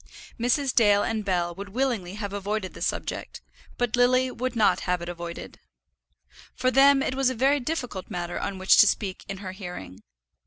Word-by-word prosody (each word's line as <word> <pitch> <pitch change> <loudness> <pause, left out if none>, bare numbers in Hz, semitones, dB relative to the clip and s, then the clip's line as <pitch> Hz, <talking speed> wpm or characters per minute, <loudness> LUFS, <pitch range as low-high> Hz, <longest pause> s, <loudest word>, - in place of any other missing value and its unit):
Mrs. 250 +3 +1
Dale 205 -3 +4
and 220 -1 -2
Bell 175 -3 0
would 200 +3 -8
willingly 220 -6 -2
have 205 -1 -5
avoided 205 -1 -3
the - - -11
subject, - - -3 0.4
but 245 -2 0
Lily 255 +1 +3
would 250 +1 -3
not 220 -2 +3
have 180 -1 -1
it 170 0 -6
avoided. 170 -1 -7 1.0
For 255 - +1
them 275 +1 +5
it - - -1
was 265 -1 +2
a 260 - -3
very 270 +5 +3
difficult 250 - -4
matter 175 0 -4
on 195 - -4
which 190 0 +4
to 210 - +8
speak 195 -2 -2
in 195 - -4
her 185 - -4
hearing. 180 - -9
210 Hz, 185 wpm, -26 LUFS, 185-255 Hz, 1.0 s, to